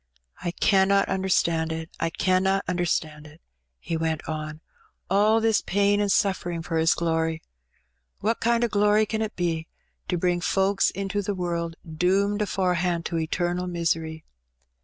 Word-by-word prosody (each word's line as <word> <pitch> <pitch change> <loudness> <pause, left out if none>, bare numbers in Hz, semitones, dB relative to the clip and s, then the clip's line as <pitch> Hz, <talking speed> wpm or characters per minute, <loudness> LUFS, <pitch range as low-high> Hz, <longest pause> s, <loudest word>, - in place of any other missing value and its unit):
''I 175 - -1
canna 195 0 +4
imderstand 170 -4 +1
it 160 0 -5
— - - -39
I 165 - 0
canna 190 +3 +1
understand 160 -4 -1
it,'^ 150 +1 -16 0.4
he 165 - -4
went 160 -1 -2
on. 155 -1 -5 0.5
''All 210 +3 +4
this 225 -1 +2
pain 205 +1 +2
and 205 - 0
suflfering 175 -2 0
for 165 - -2
His 160 +1 +3
glory. 165 -1 -1 0.8
What 225 +3 0
kind 235 +1 +2
o' - - +3
glory 210 0 +3
can 220 +1 -3
it 220 -1 -3
be, 165 -2 -1 0.4
to 180 - 0
bring 175 0 0
folks 195 +2 +2
into 195 +2 -3
the 200 0 -3
world 170 -2 -2
doomed 195 +6 +1
afore 190 -3 0
hand 175 -1 -1
to 165 - -1
eternal 175 +3 -1
misery? 165 -2 -2
180 Hz, 160 wpm, -25 LUFS, 165-200 Hz, 0.8 s, canna